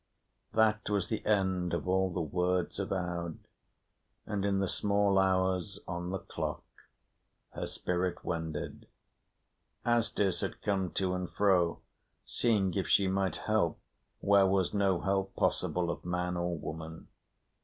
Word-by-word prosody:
That 110 -1 +2
was 100 -4 0
the 110 - -2
end 95 -4 +2
of 85 0 -4
all 95 +1 +2
the 85 -1 -1
words 90 +3 0
of 100 - -3
Aud; 85 -3 -2 0.9
and 105 -2 -2
in 100 -1 +2
the 95 0 +1
small 100 0 +2
hours 95 0 +1
on 85 0 -3
the 95 - -1
clock - - -4 0.9
her - - -4
spirit 90 0 -2
wended. 80 -3 -4 1.0
Asdis 115 -5 +2
had - - -4
come 95 -3 0
to 95 -1 0
and 90 -1 -3
fro, 90 -4 +2 0.4
seeing 105 -6 +1
if 95 -3 -1
she 100 - +4
might 95 0 0
help, 110 -7 +1 0.4
where 100 -1 +5
was 95 -2 +1
no 100 -3 +2
help 95 0 0
possible 85 -1 +1
of - - -6
man 90 0 -1
or 85 -1 -1
woman. 80 +1 -7
95 Hz, 140 wpm, -31 LUFS, 90-100 Hz, 1.0 s, where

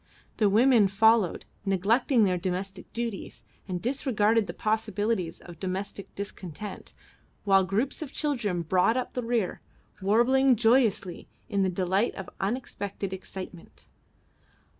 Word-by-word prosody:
The 210 -3 +4
women 230 0 +5
followed, 215 -1 +3 0.2
neglecting 215 +6 +2
their 185 -3 +2
domestic 185 +1 -4
duties 230 -4 -5 0.2
and 180 -2 -3
disregarding 225 -3 +1
the - - -5
possibilities 215 -4 -1
of 175 -2 -12
domestic 190 +1 -5
discontent, 200 -1 -7 0.5
while 195 -1 +5
groups 210 +12 -1
of 295 -4 -5
children 235 - -1
brought 185 +8 +2
up 255 - -3
the 250 - -2
rear, 230 -5 -1 0.4
warbling 245 +6 +4
joyously, 225 -6 +2 0.2
in 200 - +1
the 190 - +2
delight 185 +4 0
of 190 0 -7
unexpected 200 -3 -3
excitement. 185 -2 -9
205 Hz, 120 wpm, -27 LUFS, 190-230 Hz, 0.5 s, women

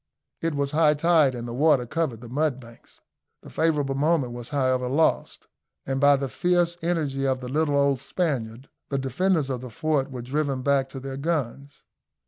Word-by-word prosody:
It 165 -2 -1
was 140 -1 -1
high 155 -1 +4
tide, 155 -4 +3
and 120 0 -6
the 120 - -5
water 140 -1 +3
covered 135 -4 -2
the 120 - -9
mudbanks. 130 -3 -4 0.4
The - - -12
favourable 150 -4 +1
moment 140 -3 +1
was 120 -1 -7
however 130 -3 0
lost, 150 +6 0 0.4
and 135 0 -2
by 145 0 +6
the 135 0 -2
fierce 175 +6 +1
energy 150 -5 -1
of 130 -1 0
the 125 -1 -7
little 145 +1 +1
old 140 -2 +2
Spaniard 135 -5 -3 0.2
the 140 - -1
defenders 140 +3 0
of 125 -2 -3
the 130 - -8
fort 145 +2 -1
were 125 -3 -7
driven 135 0 -2
back 140 -1 +2
to 135 - -7
their 135 0 -6
guns. 140 -2 -3
140 Hz, 180 wpm, -25 LUFS, 130-155 Hz, 0.4 s, by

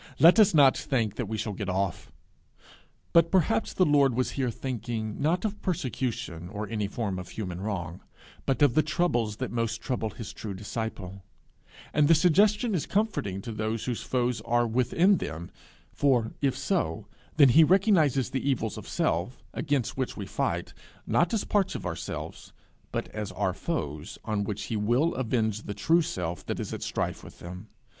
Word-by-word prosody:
Let 170 +7 +7
us 210 - +7
not 140 -3 +7
think 115 -7 -1
that 125 - -2
we 110 +1 -3
shall 105 -1 -3
get 100 -1 -4
off! 95 -1 -2 1.0
But 170 0 +6
perhaps 190 +4 +2
the 185 - +3
Lord 140 -5 +4
was 130 0 0
here 130 -3 -1
thinking, 115 -2 -4
not 170 +7 +1
of 210 -1 -3
persecution, 120 - -3
or 105 +2 -5
any 105 -3 -2
form 100 -3 -3
of 90 - -8
human 90 -4 -5
wrong, 90 -4 -4 0.5
but 135 +2 +2
of 140 -5 +5
the 155 - +5
troubles 145 -9 0
that - - -4
most 115 -1 -1
trouble 120 -3 -2
his 110 +1 -8
true 100 -3 -6
disciple; 100 -2 -5 0.7
and 150 -1 +4
the 165 - +7
suggestion 205 +7 +3
is 170 -7 -1
comforting 150 - -1
to 115 - -5
those 110 +1 -2
whose 125 -3 -2
foes 125 -2 -1
are 120 +1 +2
within 130 - +3
them, 85 - -6 0.4
for, 125 -6 +2
if 135 -2 +1
so, 135 - -1 0.3
then 140 -4 +8
he 160 +6 +7
recognizes 165 - +3
the 135 +1 -1
evils 115 -5 -1
of - - -11
self, 90 +10 -1
against 145 -6 -1
which 130 -2 -2
we 100 - -4
fight, - - -2 0.3
not 175 0 +2
as 225 - 0
parts 200 -2 +1
of - - -5
ourselves, 85 -2 -6 0.4
but - - -2
as 105 -2 -5
our - - 0
foes, 75 +2 -4
on 105 -2 0
which 105 0 -4
he 115 - -3
will 120 +11 +2
avenge 110 -4 0
the 100 - -6
true 170 +1 +3
self 90 - -3
that - - -4
is - - -4
at - - -5
strife - - -2
with - - -12
them. 90 +4 -9
120 Hz, 180 wpm, -28 LUFS, 105-150 Hz, 1.0 s, then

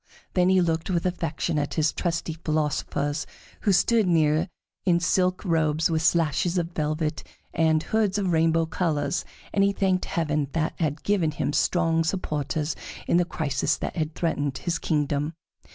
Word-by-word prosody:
Then 180 0 +3
he 190 -1 +5
looked 165 0 0
with 175 -2 0
affection 165 -3 -1
at 145 - -3
his 155 -1 +2
trusty 170 -1 -2
philosophers 150 -1 -1 0.3
who 205 - +1
stood 220 +3 +3
near 160 0 +2 0.3
in 175 -3 +3
silk 180 +2 +1
robes 160 -1 +2
with 160 -1 +1
slashes 170 +2 +2
of 170 -1 -1
velvet 155 -1 -2 0.3
and 160 -1 +2
hoods 210 -3 +1
of 190 -3 0
rainbow 165 0 +3
colors, 160 -2 -1 0.3
and 195 - +3
he 200 - +4
thanked 190 -2 +1
heaven 150 -3 -1
that 160 -1 0
had 150 -2 -1
given 195 -6 +2
him 150 -1 -2
strong 165 +1 +2
supporters 150 -3 -2 0.3
in - - +3
the 175 - +3
crisis 155 -3 -1
that - - -4
had 155 -2 -2
threatened 145 -5 -1
his 170 - -2
kingdom. 150 0 0
165 Hz, 160 wpm, -25 LUFS, 155-180 Hz, 0.3 s, he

